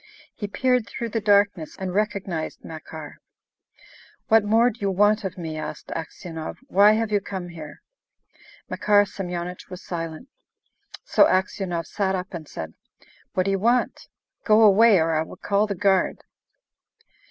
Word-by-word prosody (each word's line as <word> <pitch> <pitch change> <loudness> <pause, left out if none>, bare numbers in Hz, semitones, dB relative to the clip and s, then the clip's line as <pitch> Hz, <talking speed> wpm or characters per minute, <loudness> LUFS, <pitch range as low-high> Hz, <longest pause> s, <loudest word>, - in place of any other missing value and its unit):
He 205 - -5
peered 250 +2 +1
through 235 - -5
the 225 0 -2
darkness 200 -5 +2
and 190 -1 -4
recognised 195 -6 -2
Makar. 155 -1 -9 1.1
"What 225 -1 +6
more 225 +4 +3
do 235 - -16
you 200 - 0
want 205 +3 +3
of 190 -1 -5
me?" 160 -3 -5
asked 150 0 -7
Aksionov. 165 0 -6
"Why 205 +1 +6
have 220 0 -1
you 205 -1 +2
come 190 -3 -6
here?" 155 -3 -10 0.8
Makar 205 -1 +3
Semyonich 180 -2 -6
was 180 -1 -9
silent. 165 - -6 0.8
So - - +5
Aksionov 185 -2 -1
sat 195 -2 -1
up 185 0 -5
and 160 -3 -7
said, 80 - -7 0.6
"What 185 - +2
do 195 - 0
you 195 - 0
want? 240 +5 +1 0.4
Go 215 0 +5
away, 215 +1 +6
or 165 -1 +1
I 155 - +1
will 160 - -7
call 205 +1 +1
the 200 - -3
guard!" 190 0 +1
195 Hz, 155 wpm, -24 LUFS, 170-210 Hz, 1.1 s, What